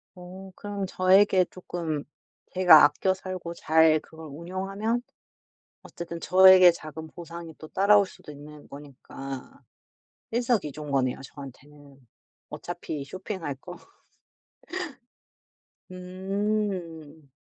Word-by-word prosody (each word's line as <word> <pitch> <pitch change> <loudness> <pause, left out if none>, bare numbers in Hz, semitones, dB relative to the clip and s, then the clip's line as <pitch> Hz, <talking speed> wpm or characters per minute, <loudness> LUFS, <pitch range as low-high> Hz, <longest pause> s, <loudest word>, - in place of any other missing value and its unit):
어. 185 +1 -11
그럼 205 -1 -5
저에게 185 0 +4
조금 170 -5 -5 0.5
제가 180 -4 +8
아껴 150 +6 +3
살고 185 -2 -7
잘 160 -1 +4
그걸 160 0 -13
운용하면 195 +9 -3 0.8
어쨌든 170 0 -8
저에게 185 0 +7
작은 160 -1 -9
보상이 170 0 -9
또 155 - -11
따라올 200 +3 +4
수도 150 - -13
있는 150 +1 -13
거니까 135 -1 -10 0.7
일석이조인 195 - -1
거네요, 130 -2 0
저한테는. 140 +1 -13 0.5
어차피 165 -4 -6
쇼핑할 185 -1 -6
거. 175 +6 -11 2.1
음. 185 -5 -4
170 Hz, 215 characters per minute, -26 LUFS, 150-190 Hz, 2.1 s, 제가